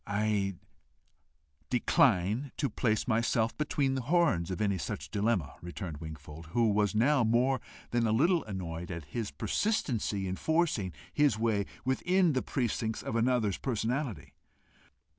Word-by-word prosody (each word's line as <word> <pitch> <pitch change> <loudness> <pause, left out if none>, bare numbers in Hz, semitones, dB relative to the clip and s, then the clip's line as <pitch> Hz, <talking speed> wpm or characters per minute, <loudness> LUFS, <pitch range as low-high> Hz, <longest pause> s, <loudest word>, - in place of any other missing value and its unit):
"I 100 -2 0 1.1
decline 125 - +2
to 140 -5 -1
place 110 -2 0
myself 115 -1 +1
between 145 -3 0
the 135 - -1
horns 140 - +2
of 95 - -3
any 100 -3 +1
such 70 -1 -5
dilemma," 100 -7 0
returned 85 -2 -6
Wingfold, 80 +1 -9
who 115 -2 +3
was 105 0 +1
now 130 +4 +4
more 125 +4 +2 0.3
than 120 -1 +2
a - - +1
little 165 +10 +3
annoyed 90 -4 -5
at 85 -4 -5
his 110 +5 -4
persistency 115 - -1
in 95 0 -3
forcing 160 - +1 0.2
his 145 -7 +3
way 110 -3 +1 0.2
within 175 +6 +2
the 130 - +1
precincts 115 -3 -2
of - - -3
another's 115 -4 +1
personality. 125 0 -2
110 Hz, 140 wpm, -31 LUFS, 95-130 Hz, 1.1 s, now